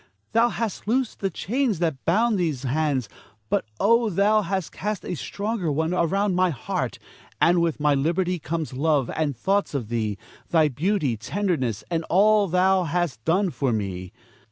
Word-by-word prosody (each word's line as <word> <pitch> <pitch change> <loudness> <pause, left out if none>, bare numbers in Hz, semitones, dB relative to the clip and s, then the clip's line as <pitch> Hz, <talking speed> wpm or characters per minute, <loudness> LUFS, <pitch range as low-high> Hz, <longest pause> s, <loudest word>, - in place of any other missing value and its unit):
thou 230 +1 +4
hast 230 -4 -4
loosed 250 +1 0
the 195 - 0
chains 230 - -1
that 160 -6 -2
bound 220 +6 +3
these 155 -7 -1
hands, 135 -2 0 0.4
but - - +1
oh, 230 +1 +4
thou 205 +3 +3
hast 190 -2 -3
cast 210 0 -4
a - - -3
stronger 200 - -3
one 160 +4 0
around 190 +3 +1
my 185 0 +3
heart; 140 -8 -3 0.4
and 175 0 +4
with 165 -3 0
my 150 -1 +3
liberty 175 +5 0
comes 160 -2 -4
love, 140 -1 +1
and 150 -5 -1
thoughts 195 - 0
of 120 -6 -3
thee, 110 -4 -1 0.3
thy 160 -2 +4
beauty, 150 - 0
tenderness, 130 - -2
and 165 -1 0
all 205 +3 +4
thou 185 +1 +3
hast 160 -9 -2
done 185 +3 +2
for 135 -5 -1
me. 95 -4 -3
170 Hz, 165 wpm, -24 LUFS, 145-200 Hz, 0.4 s, thou